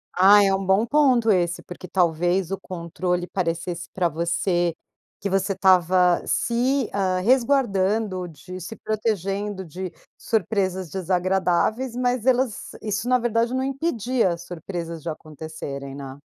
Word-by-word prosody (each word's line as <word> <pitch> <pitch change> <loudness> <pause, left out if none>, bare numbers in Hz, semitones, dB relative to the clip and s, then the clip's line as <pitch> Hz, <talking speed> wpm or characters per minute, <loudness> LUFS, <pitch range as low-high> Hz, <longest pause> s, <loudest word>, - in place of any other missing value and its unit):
Ai, 200 +3 +7
é 195 - +3
um 195 - -3
bom 190 +4 +3
ponto 250 -4 +4
esse, 175 -2 +1
porque 180 +1 -9
talvez 175 +1 +1
o 195 - -1
controle 180 0 -3
parecesse 170 -1 -3
pra 180 -2 +1
você, 170 +1 0 0.4
que 200 - -3
você 195 +1 +1
estava 185 -1 +4
se, 250 +2 +1
ah, 185 -2 +1
resguardando 215 -5 +2
de 175 +4 -10
se 200 +6 -7
protegendo 205 -3 -2
de 180 +3 -6 0.2
surpresas 190 -5 -1
desagradáveis, 190 - 0
mas 250 -1 0
elas, 255 -3 +1
isso 210 +3 -2
na 255 - +5
verdade 235 +1 0
não 260 - 0
impedia 260 - 0
as 170 +1 -8
surpresas 170 -1 -6
de 170 - -4
acontecerem, 150 -3 -7
né? 135 -1 -8
190 Hz, 135 wpm, -24 LUFS, 175-225 Hz, 0.4 s, Ai